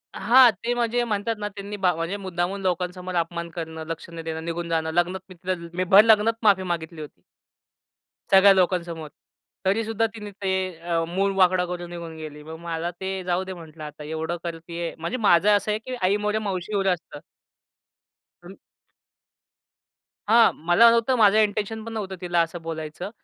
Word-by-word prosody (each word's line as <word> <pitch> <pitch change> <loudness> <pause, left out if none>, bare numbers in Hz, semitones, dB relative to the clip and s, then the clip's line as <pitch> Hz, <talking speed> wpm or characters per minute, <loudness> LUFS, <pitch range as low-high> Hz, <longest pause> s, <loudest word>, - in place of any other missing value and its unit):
हां, 250 0 +7
ते 240 - 0
म्हणजे 240 0 0
म्हणतात 220 0 -1
ना 205 - -2
त्यांनी 205 +1 -6
बा 185 -2 +2
म्हणजे 165 +5 -3
मुद्दामहून 185 0 -3
लोकांसमोर 180 0 -2
अपमान 170 0 -2
करणं, 160 -1 -6
लक्ष 165 0 -6
न 170 -1 -7
देणं, 160 0 -5
निघून 170 0 -4
जाणं, 160 -1 0
लग्नात 175 +2 +1
मी 185 - -12
तिला 185 +2 -2 0.2
मी 185 +1 -1
भर 195 +3 +7
लग्नात 220 0 +4
माफी 195 -3 +4
मागितली 165 -2 -4
होती. 150 - -11 1.1
सगळ्या 195 +1 +8
लोकांसमोर. 170 -4 0 0.6
तरीसुद्धा 225 +3 +1
तिनी 210 -2 -8
ते 195 -1 -3 0.3
अ, 170 -1 -1
मूळ 195 +3 0
वाकडा 185 -1 +4
करून 175 -1 -6
निघून 170 -2 -7
गेली. 150 -1 -9
मग 160 +1 -8
मला 170 0 -3
ते 190 0 -3
जाऊदे 185 +1 -2
म्हंटलं, 160 -3 -11
आता 150 0 -9
एवढं 160 +3 -3
करतीये, 170 0 -5
म्हणजे 170 +10 -3
माझं 175 +5 +5
असं 205 +1 0
आहे, 210 - -1
की 255 +3 -6
आई 190 +3 +3
मरो 210 +1 +1
मावशी 200 -1 -3
वगैरे 195 -1 +2
असतं. 180 -2 -3 1.2
पण - - -12 1.7
हां, 230 +1 +6
मला 175 +8 +5
नव्हतं, 235 +3 +2
माझं 210 -2 +5
इंटेन्शन 215 +1 0
पण 230 - -7
नव्हतं 195 -4 -4
तिला 175 -1 0
असं 165 +1 -3
बोलायचं. 160 +2 -6
180 Hz, 170 wpm, -24 LUFS, 170-205 Hz, 1.7 s, सगळ्या